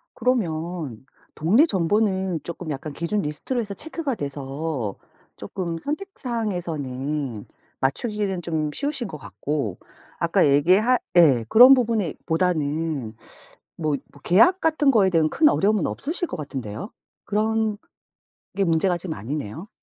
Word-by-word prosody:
그러면 170 - -2 0.3
동네 195 - +4
정보는 190 - +1
쪼끔 170 -1 -6
약간 145 +1 -5
기준 170 +7 -1
리스트로 150 - -3
해서 205 -3 -5
체크가 320 +1 -3
돼서 140 - -4 0.4
쪼끔 170 -3 -4
선택사항에서는 165 - -3 0.4
맞추기는 195 - -1
좀 160 -2 -1
쉬우신 280 - -2
것 150 - -7
같고. 140 -7 -4 0.4
아까 - - +3
얘기할 185 - +4 0.2
예. 140 -9 +6
그런 250 - +9
부분에 225 - 0
보다는 160 -7 -1 0.6
뭐 155 -2 -1 0.2
뭐 145 - -18
계약 355 - +5
같은 310 -3 +2
거에 210 -7 +5
대한 160 -3 +3
큰 305 - +4
어려움은 210 -3 +2
없으실 345 +5 -3
것 - - -5
같은데요. 135 - -6 0.3
그런 220 0 0 0.8
게 200 - +1
문제가 175 +1 +2
좀 175 -1 -5
아니네요. 145 - -5
175 Hz, 280 characters per minute, -24 LUFS, 150-220 Hz, 0.8 s, 그런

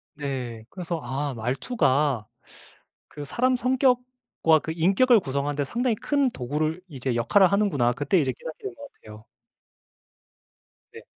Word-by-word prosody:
네. 130 -6 -5
그래서 175 -3 -4
'아 135 +3 -3
말투가 135 - 0 0.8
그 145 - -8
사람 250 - +1
성격과 250 - +1
그 160 - -4
인격을 200 +8 +4
구성하는데 145 -2 -2
상당히 235 - -1
큰 280 +4 +1
도구를 155 - -2
이제 130 -5 -3
역할을 175 - +4
하는구나.' 175 -13 +2
그때 145 +8 +1
이제 135 -4 +1
깨닫게 160 - -9
된 400 - -5
것 285 0 -10
같아요. 105 0 -13 1.7
네. - - -11
155 Hz, 280 characters per minute, -25 LUFS, -, 1.7 s, 인격을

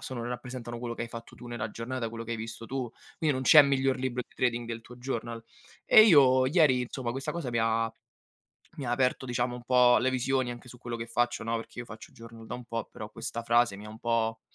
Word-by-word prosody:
sono 125 -3 -5
rappresentano 120 -1 -6
quello 120 0 -4
che - - -4
hai 120 - -5
fatto 115 0 -9
tu 120 - -11
nella 115 -2 -4
giornata, 115 +2 -4
quello 115 0 -7
che 115 - -8
hai - - -2
visto 115 +1 -7
tu. 130 -1 -3 0.3
Quindi, 155 -2 +2
non 130 -1 -2
c'è 150 +3 +9
miglior 135 -1 +1
libro 125 -1 -2
di - - -26
trading 120 -1 0
del 115 0 -5
tuo 125 - -13
journal. 120 -2 -4 0.4
E 215 - +8
io 130 -9 +6
ieri 140 -4 +4
insomma, 125 0 -4
questa 135 +2 -4
cosa 170 -7 -4
mi 120 - 0
ha 115 0 +1 0.8
mi 140 - -5
ha - - -1
aperto, 130 +1 +1
diciamo, 120 0 -1
un 125 - -10
po' 125 -1 +5
le 130 - +1
visioni 130 0 0
anche 120 0 -9
su 125 - -11
quello 120 -1 -5
che 115 0 -5
faccio, 120 0 -1
no, 115 +1 -1
perché 115 +1 -8
io - - -6
faccio 115 -2 -11
journal 115 -1 -12
da - - -5
un 125 - -10
po', 115 -1 -4
però 105 - -8
questa 115 +1 -5
frase 120 -3 +3
mi 105 - -10
ha - - -9
un 110 +1 -12
po' 115 -1 0
120 Hz, 250 wpm, -29 LUFS, 115-130 Hz, 0.8 s, c'è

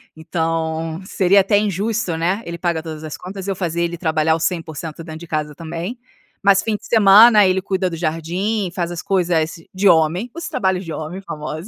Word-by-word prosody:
então 160 0 -2
seria 190 +1 +3
até 200 +2 +2
injusto, 205 -2 -1
né. 180 +6 0
Ele 170 0 -5
paga 170 -2 -1
todas 160 -2 -7
as 155 -1 -6
contas, 190 +1 -8
e - - 0
eu - - -2
fazer 170 -2 -2
ele 170 0 -2
trabalhar 160 -1 +1
o - - -4
100% 165 -2 -3
dentro 160 -1 -8
de 170 - -10
casa 150 -1 -2
também. 170 - -5 0.5
Mas 195 -1 +5
fim 220 -2 -1
de 210 - -9
semana, 215 0 +7
ele 185 0 +1
cuida 190 -1 -1
do 170 - -5
jardim, 175 +6 -2
faz 175 -2 -2
as 175 - -5
coisas, 170 -4 +1 0.2
"de 195 +2 +2
homem", 175 +6 +3
os 340 +1 -5
trabalhos 190 -1 0
de 165 - -7
homem, 160 +5 -5
famosos. 155 -1 -6
175 Hz, 200 wpm, -20 LUFS, 160-195 Hz, 0.5 s, semana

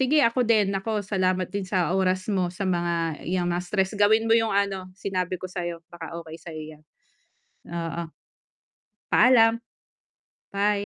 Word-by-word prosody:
sige 285 +3 +4
ako 235 +2 +3
din, 215 -4 +3
naku, 210 +2 -1
salamat 185 -2 0
din 200 -1 -2
sa 180 -1 +1
oras 185 -1 +1
mo, 185 -2 +1
sa 185 +3 -5
mga 170 -3 -1
yang 180 -1 0
mga 175 +1 -1
stress, 190 +2 -1
gawin 220 +2 +4
mo 225 - +5
yung 225 -1 +3
ano, 195 -2 0
sinabi 185 -2 -2
ko 185 - -6
sa'yo, 175 -2 -4
baka 170 -2 -8
okay 160 -1 -9
sa'yo 160 -2 -7 0.2
yan. 155 - -27 0.8
Oo. 170 0 -4 1.0
Paalam. 230 -2 +6 0.9
Bye. 205 +1 +1
185 Hz, 155 wpm, -25 LUFS, 175-210 Hz, 1.0 s, Paalam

